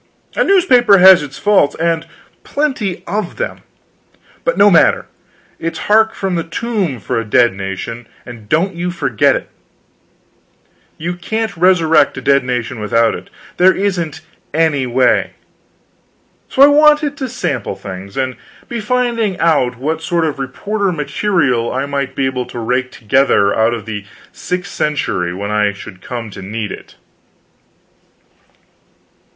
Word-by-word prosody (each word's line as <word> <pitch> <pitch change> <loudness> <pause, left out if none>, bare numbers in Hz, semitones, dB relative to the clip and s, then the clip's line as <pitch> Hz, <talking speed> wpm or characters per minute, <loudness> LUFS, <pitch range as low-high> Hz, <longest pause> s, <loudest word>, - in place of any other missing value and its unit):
A - - +2
newspaper 250 - +5
has 190 0 +8
its 135 -2 -8
faults, 205 -7 +2
and 165 0 -1 0.4
plenty 260 -11 -2
of 210 +1 -3
them, - - -4 0.8
but - - 0
no 205 - +6
matter, 170 - +4 0.5
it's 165 +1 -4
hark 220 +1 +4
from 195 -2 -2
the 170 -1 -1
tomb 185 - -3
for 100 - -2
a - - -2
dead 115 +1 +3
nation, 100 +5 -6 0.2
and 115 -4 -11
don't 185 +5 +1
you 175 +1 -3
forget 180 - +1
it. - - -5 1.5
You 170 +2 -3
can't 220 +4 -3
resurrect 165 -5 +3
a - - -4
dead 140 +1 +3
nation 125 -2 -3
without 115 +2 +2
it; - - -9 0.3
there 185 +1 +5
isn't 175 -7 -2 0.3
any 155 -5 +1
way. 125 +1 +2 1.2
So 270 - +5
I - - +9
wanted 295 0 +4
to 265 -4 -4
sample 130 - -3
things, 95 0 -9
and 130 -1 -2 0.3
be 235 - -4
finding 230 -3 0
out 145 -8 +1
what 155 +5 -2
sort 170 0 0
of 150 -3 -3
reporter 200 +9 -2
material 145 - 0
I 135 +2 -2
might 140 -2 -3
be 135 - 0
able 130 -2 -2
to 125 - -9
rake 125 +3 -1
together 110 -3 +2
out 110 +1 +2
of 110 -3 -8
the 105 -3 -5 0.3
sixth 180 0 -4
century 140 -12 -1
when 100 +3 -5
I 105 -1 +1
should 95 -1 -11
come 115 -1 -6
to 100 - -9
need 105 +2 -5
it. - - -10
155 Hz, 145 wpm, -16 LUFS, 120-195 Hz, 1.5 s, I